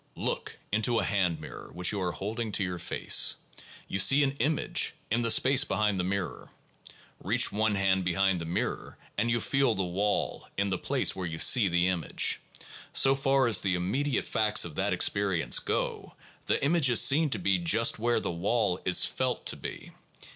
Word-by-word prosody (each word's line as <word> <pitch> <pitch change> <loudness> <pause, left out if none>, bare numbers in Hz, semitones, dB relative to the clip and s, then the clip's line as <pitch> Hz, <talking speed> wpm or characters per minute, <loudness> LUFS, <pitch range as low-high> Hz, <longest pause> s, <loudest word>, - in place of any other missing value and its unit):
Look - - -4
into 110 +3 +1
a - - +1
hand 90 -6 -1
mirror 75 - -10
which 90 +1 +1
you 100 -2 -4
are 90 -1 -1
holding 110 +4 -5
to 100 - +2
your 90 -2 -4
face. - - +2 0.5
You 95 - -3
see 135 +9 +5
an 135 - +1
'image' 150 +4 0 0.2
in 115 +1 +1
the 115 - 0
space 130 +4 +4
behind 105 -3 -1
the - - 0
mirror. 95 -2 -4 0.7
Reach - - +2
one 110 0 0
hand 95 -1 +1
behind 90 0 0
the - - -5
mirror 85 - -4 0.2
and 120 - -1
you 120 0 +1
feel 135 0 0
the 95 - -1
wall 100 +4 -2
in 100 0 -1
the 95 - -2
place - - 0
where 90 -1 -5
you 80 -1 -6
see 110 +4 +4
the 90 0 +1
image. 90 -4 +1 0.5
So 135 - +4
far 135 0 +1
as 110 -6 +3
the 95 -2 0
immediate 125 +11 -2
facts 105 -3 +1
of 85 - -8
that - - -2
experience 100 -4 +1
go, - - -4 0.3
the - - 0
image 155 -3 +3
is 120 - +4
seen 150 +3 +4
to 110 - -1
be 95 0 0
just 110 +7 +2
where 120 +1 +1
the - - -3
wall 95 +2 -1
is 90 - +5
felt - - -3
to - - +1
be. - - -8
100 Hz, 190 wpm, -28 LUFS, 90-120 Hz, 0.7 s, see